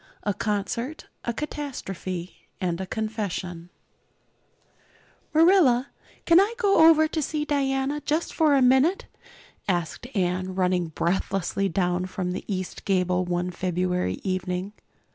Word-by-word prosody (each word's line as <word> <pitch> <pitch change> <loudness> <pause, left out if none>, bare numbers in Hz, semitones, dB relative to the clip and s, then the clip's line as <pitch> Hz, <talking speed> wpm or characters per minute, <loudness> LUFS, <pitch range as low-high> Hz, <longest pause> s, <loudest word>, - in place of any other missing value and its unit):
A 205 - 0
Concert 215 +8 -3 0.2
a 235 - 0
Catastrophe 195 - -6
and 180 -2 -1
a 190 - -5
Confession 195 -6 -4 1.6
MARILLA, 315 -6 +5 0.4
can 335 +1 +7
I 415 +4 +2
go 395 -8 +6
over 315 -1 +5
to 315 0 -2
see 300 +1 -2
Diana 280 0 0
just 310 +4 -1
for 310 -3 +4
a 270 - +4
minute?" 265 +9 +4 0.6
asked 175 +5 -2
Anne, 185 0 -1
running 180 -2 +1
breathlessly 190 +3 -1
down 180 0 0
from 185 -1 -3
the 185 - -4
east 185 -1 -4
gable 185 -2 +1
one 175 +1 -1
February 180 - -1
evening. 185 +1 -2
195 Hz, 125 wpm, -25 LUFS, 180-285 Hz, 1.6 s, can